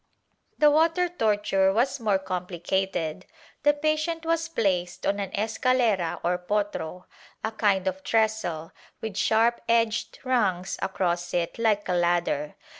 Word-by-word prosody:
^ - - -46
The 300 -1 +6
water 330 +4 +3
torture 205 - +1
was 240 +7 +1
more 210 -4 +2
complicated. 180 -1 -3 0.3
The 295 +1 +4
patient 310 +2 -1
was 330 0 0
placed 185 - -1
on 200 +1 +1
an 195 -2 -3
escalera 220 -4 +1
or 180 +1 +1
potro 180 -3 -3 0.2
— - - -26
a 220 - -1
kind 200 -4 +1
of 190 0 -2
trestle, 215 -7 0 0.3
with 220 -3 -5
sharp 230 +3 +2
edged 230 -1 +1
rungs 200 -8 0
across 175 -2 -1
it 170 -1 0
hke 215 -3 +1
a 180 - 0
ladder. 175 -4 0
205 Hz, 140 wpm, -26 LUFS, 180-235 Hz, 0.3 s, The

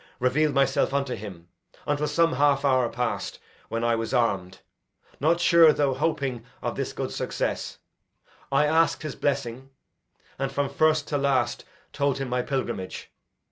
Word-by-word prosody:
reveal'd 145 +5 +2
myself 135 0 +2
unto 140 -2 0
him 95 -5 -8 0.4
Until 145 +1 0
some 165 +1 +2
half 140 +1 +2
hour 130 -3 +3
past, 120 0 -3 0.3
when 115 +1 -2
I 120 0 +2
was 115 +3 -2
arm'd, 95 -6 0 0.6
Not 165 +4 +2
sure, 170 -2 +7
though 145 -3 +1
hoping 130 -5 -1 0.2
of - - -3
this - - -3
good - - -4
success, - - -3 0.7
I 150 - +4
ask'd 160 0 +2
his 155 - -5
blessing, 130 -2 -2 0.7
and 135 0 -1
from 140 0 -1
first 155 +1 +2
to 145 - 0
last 130 -4 0 0.3
Told 140 -2 0
him 135 -2 -4
my 125 0 0
pilgrimage. 120 -8 -4
135 Hz, 150 wpm, -26 LUFS, 120-145 Hz, 0.7 s, sure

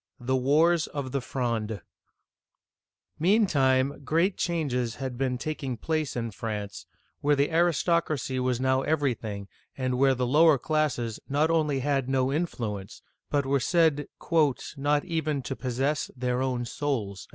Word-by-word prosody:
THE 130 +2 0
WARS 155 +6 +3
OF 140 -3 -5
THE 140 0 -1
FRONDE 115 -5 -2 1.4
MEANTIME, 140 -8 +3
great 165 +7 +1
changes 125 -9 -1
had 130 -1 -5
been 125 0 -1
taking 135 -3 -4
place 155 +3 -2
in 115 -2 -3
France, 105 -2 -5 0.3
where 145 0 +3
the 140 +3 +1
aristocracy 160 -4 +1
now - - 0
was 130 +1 +1
every 145 -4 +2
thing, 100 -3 -7 0.3
and 130 -1 -1
where 135 -1 +4
the 125 0 0
lower 150 +4 +5
classes 130 -6 -1
not 150 +4 +2
only 150 -4 +1
had 135 -1 0
no 130 -1 +2
influ 125 - -2
ence, 95 +4 -14 0.3
but 145 -2 +1
were 140 +1 +2
said 155 +1 +2 0.7
"not 145 +1 +1
even 155 -5 -1
to 135 - -4
possess 135 +4 -1
their 125 0 -1
own 125 -2 -1
souls." 115 -8 -3
135 Hz, 145 wpm, -27 LUFS, 125-150 Hz, 1.4 s, lower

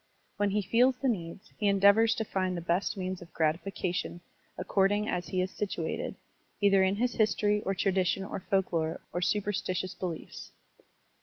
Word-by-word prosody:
When 205 0 +2
he 205 +1 0
feds 245 +6 +3
the 270 - -1
needs, 190 -3 -4
he 210 - +1
endeavors 200 +3 +5
to 220 - -2
find 185 -3 -1
the - - -4
best 175 +4 0
means 185 -1 -3
of 170 - -12
gratification 175 +2 -1 0.4
according 195 +3 +1
as 180 -3 -2
he 185 - 0
is 185 +1 -2
situated, 180 -6 -3 0.4
either 195 -2 +5
in 190 +1 +3
his 240 +4 0
history 210 -1 +2
or 195 - +1
tradition 190 0 +1
or 200 - -5
folklore 175 -4 -1
or 175 - -1
superstitious 190 -2 -1
beliefs. 175 -4 -6
195 Hz, 160 wpm, -30 LUFS, 180-205 Hz, 0.4 s, endeavors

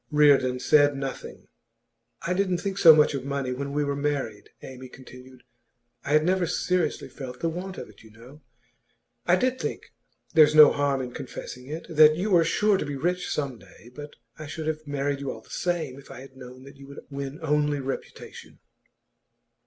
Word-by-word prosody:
Reardon 140 -4 +4
said 145 +2 +4
nothing. 135 -1 -7 0.8
'I 180 - -1
didn't 185 -1 0
think 195 +2 -4
so 160 -4 +9
much 150 -1 +3
of 135 -2 -4
money 140 -2 -3
when 140 +2 -5
we 145 +1 0
were 140 0 -2
married,' 140 -8 -3
Amy 130 0 -10
continued. 125 0 -14 0.6
'I 145 - -2
had 155 0 +4
never 185 -1 +1
seriously 180 +1 -1
felt 125 -3 -9
the 165 - -1
want 185 +3 -6
of - - -7
it, - - -18
you 110 - -16
know. 120 +7 -16 0.9
I 175 - +5
did 255 +6 0
think - - -6 0.4
there's 155 -2 +6
no 155 -1 +9
harm 140 -2 0
in 125 - -7
confessing 125 0 -9
it 155 +3 -6
that 155 -2 +6
you 195 +6 -2
were 170 -3 +5
sure 210 +4 +2
to - - -3
be 145 - -4
rich 180 +6 -2
some 135 -5 -3
day; 120 +3 -17
but 145 +2 -10 0.2
I 155 - -7
should 155 +2 -6
have 155 -1 -4
married 140 0 -2
you 140 -1 -5
all - - -7
the - - -20
same 160 -7 -3
if 140 - -16
I - - -10
had 135 0 -14
known 130 0 -12
that 140 +1 -14
you 140 0 -13
would 140 - -10
win 140 +1 -6
only 150 -1 +1
reputation. 135 0 -8
145 Hz, 195 wpm, -25 LUFS, 135-160 Hz, 0.9 s, so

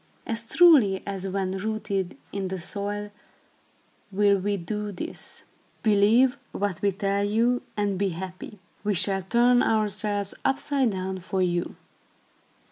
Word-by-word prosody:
As 225 0 -2
truly 230 - +5
as 195 -1 -4
when 190 0 -2
rooted 200 -3 -3
in 195 -1 -3
the 190 +1 -4
soil, 205 +3 -4 1.0
will 200 0 +3
we 200 +2 -1
do 210 +3 -4
this. 180 - -6 0.4
Believe 220 +5 +4
what 200 -3 -2
we 200 - +2
tell 200 +1 -1
you, 230 +4 +2 0.2
and 200 -2 0
be 200 -1 +1
happy. 185 +4 -7 0.3
We 205 -1 +1
shall 195 +1 +3
turn 240 +5 +3
ourselves 210 -2 0
upside 270 -1 +1
down 190 -1 -3
for 185 +1 -1
you." 175 -1 -1
200 Hz, 130 wpm, -26 LUFS, 190-215 Hz, 1.0 s, truly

